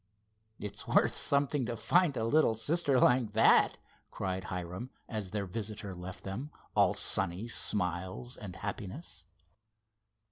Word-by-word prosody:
"It's 105 -1 -6
worth - - +3
something 140 -2 +1
to 120 - -2
find 170 +4 +2
a 110 - 0
little 115 -2 +3
sister 140 +3 +1
like 125 -4 +4
that," 110 +1 +5 0.3
cried 95 0 -3
Hiram, 90 +6 -5 0.2
as 105 -4 -4
their 100 0 -2
visitor 105 +1 -5
left 90 +2 -8
them, 110 +10 -5 0.3
all - - +4
sunny 95 +3 +2
smiles 95 +2 -2
and 95 -4 -8
happiness. 100 - -6
105 Hz, 130 wpm, -32 LUFS, 95-125 Hz, 0.3 s, that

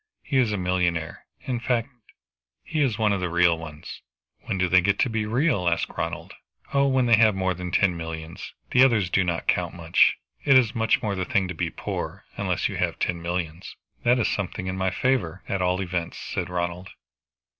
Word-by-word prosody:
He 135 - -1
is 120 -4 +2
a 105 - -1
millionaire. 90 -3 -1
In 125 -2 -3
fact 120 -1 0 0.7
he 155 -2 -2
is 125 -7 +1
one 110 -2 +2
of 100 - -1
the 90 - -1
real 85 0 +4
ones." 75 -2 -9 0.4
"When 100 - -2
do 90 0 +2
they 90 +1 +5
get 100 +2 +1
to 125 - +1
be 110 -1 -1
real?" 115 - +1
asked 85 - -1
Ronald. - - -4 0.4
"Oh, 140 0 +4
when 130 -2 +2
they 115 -2 +5
have 110 -2 +5
more 95 -1 0
than 90 0 -6
ten 90 0 +2
millions. 80 0 -7 0.2
The 125 - +6
other 130 -3 +5
ones 95 -5 0
do 95 - +3
not 85 -2 -2
count 90 -2 0
much. 85 -1 +3 0.3
It 140 -2 +6
is 120 -3 +3
much 115 -2 +1
more 105 -2 0
the 95 -1 -2
thing 95 +1 +1
to - - -3
be 80 - -2
poor, - - -5
unless - - 0
you - - -5
have - - -1
ten 85 -1 -2
millions." 85 0 -4 0.3
"That 120 +1 +3
is 120 - +1
something 95 -2 -3
in 95 0 -3
my 95 0 0
favor, 95 -5 -1
at 100 -1 -1
all 90 0 +1
events," 85 -2 -3
said - - -4
Ronald. 90 +1 -3
95 Hz, 210 wpm, -25 LUFS, 85-115 Hz, 0.7 s, The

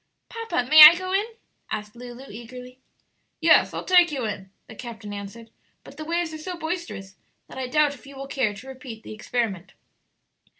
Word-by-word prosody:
"Papa, 455 - -3
may 310 +3 +8
I 305 +3 +12
go 370 +1 -5
in?" 400 +2 +2 0.4
asked 210 +1 -5
Lulu, 245 +2 -10
eagerly. 250 +3 -11 0.6
"Yes; - - +4
I'll - - -6
take 355 -2 +5
you 265 -5 -3
in," 195 -3 -5 0.2
the - - -12
captain 220 -3 -9
answered; 205 +3 -9 0.3
"but 280 - -14
the 310 - -7
waves 340 0 -2
are 315 - -7
so 360 +3 -6
boisterous 320 - -6 0.3
that - - -10
I 260 - -3
doubt 300 +2 +2
if 280 0 -16
you 280 - -12
will 270 0 -7
care 255 -6 -1
to 225 +6 -12
repeat 255 -4 -10
the - - -9
experiment. 215 -5 -3
255 Hz, 185 wpm, -24 LUFS, 225-310 Hz, 0.6 s, I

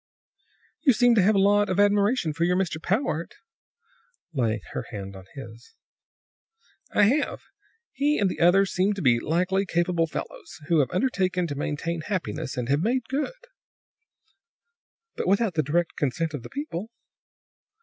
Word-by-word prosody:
"You 270 -5 +5
seem 245 +1 +4
to 220 - +4
have 205 +3 +4
a - - +4
lot 205 +1 +3
of 185 - 0
admiration 205 -3 +2
for 165 +3 -1
your 180 +1 +2
Mr. 170 -4 -2
Powart," 175 - -1 1.0
laying 115 -6 0
her - - -5
hand 100 -1 -7
on 95 -1 -11
his. 120 - -11 1.2
"I 210 - +3
have. 275 +8 +1 0.5
He 290 +3 +1
and 200 - +2
the 185 - -4
others 190 +3 +4
seem 190 +3 +2
to 195 - -5
be 120 -3 +4
highly 180 +7 0
capable 170 -1 +1
fellows, 160 - -7
who 165 -2 +4
have 140 - +2
undertaken 185 -5 0
to 150 - -4
maintain 160 +4 -3
happiness, 155 - -4
and 125 -1 -2
have 140 +3 +2
made 245 +6 +1
good." 485 - -3 1.7
"But - - -3
without 200 +1 +2
the 160 - +2
direct 165 +4 -1
consent 155 +3 -1
of 145 - -4
the - - -10
people." 270 - -5
180 Hz, 160 wpm, -25 LUFS, 155-205 Hz, 1.7 s, You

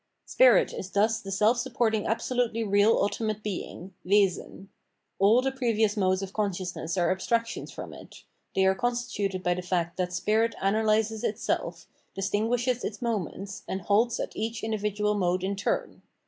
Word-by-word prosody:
Spirit - - +5
is 190 - -6
thus 220 +3 +1
the 195 - -7
self 210 +5 +3
supporting 235 -4 0
absolutely 230 0 0
real 205 +1 +4
ultimate 215 +1 -1
being 190 -2 -6
(Wesen). 195 0 +1 0.5
All 215 +6 +5
the 270 - 0
previous 225 -5 +1
modes 190 -2 +1
of 195 0 -7
consciousness 185 -4 -3
are 175 0 +2
abstractions 230 +5 -1
from - - -8
it; - - -13 0.3
they 190 - +3
are 190 - +5
constituted 210 -4 -2
by 180 - +2
the 180 - -4
fact 175 -2 -2
that 180 -1 -1
spirit 220 +5 +1
analyses 215 +2 +1
itself, 210 +2 -2 0.3
distinguishes 225 +6 0
its 215 - -4
moments, 200 -4 -3
and 190 - -3
halts 215 +6 +2
at - - -4
each 225 +1 -3
individual 210 -1 0
mode 185 -2 0
in 195 +1 -1
turn. 195 - -2
210 Hz, 155 wpm, -27 LUFS, 190-225 Hz, 0.5 s, Spirit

